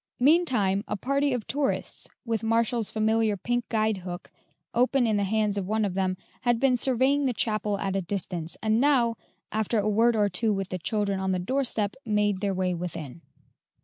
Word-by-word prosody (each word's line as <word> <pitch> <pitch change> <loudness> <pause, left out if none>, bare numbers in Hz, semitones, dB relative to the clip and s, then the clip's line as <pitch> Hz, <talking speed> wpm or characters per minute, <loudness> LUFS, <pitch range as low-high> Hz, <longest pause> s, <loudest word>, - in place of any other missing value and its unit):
Meantime, 250 - +3
a 210 - -2
party 275 +6 0
of 245 -4 -2
tourists, 280 0 -1 0.2
with 225 -2 -1
Marshall's 230 0 +1
familiar 220 -1 +1
pink 240 +4 -2
guide 220 -2 +1
hook 180 -1 -8 0.4
open 250 +1 +3
in 220 -2 +1
the 205 - +1
hands 210 0 +1
of 185 - -4
one 215 +1 +1
of 195 - -2
them, 185 -1 0 0.2
had 240 -2 +2
been 265 -1 +3
surveying 265 +3 +2
the 250 -3 0
chapel 215 -1 -1
at 195 -1 -2
a 195 - +1
distance, 175 -3 -2
and 220 +1 +2
now, 255 -5 +3 0.4
after 220 +1 0
a 210 0 +1
word 225 +3 +3
or 210 -1 +3
two 220 +2 0
with 195 -2 -2
the 185 - -4
children 200 +1 -1
on 190 0 0
the - - +1
doorstep, 215 0 -1
made 210 -3 +1
their 200 -1 0
way 185 -1 0
within. 165 -4 -6
215 Hz, 190 wpm, -27 LUFS, 195-240 Hz, 0.4 s, Meantime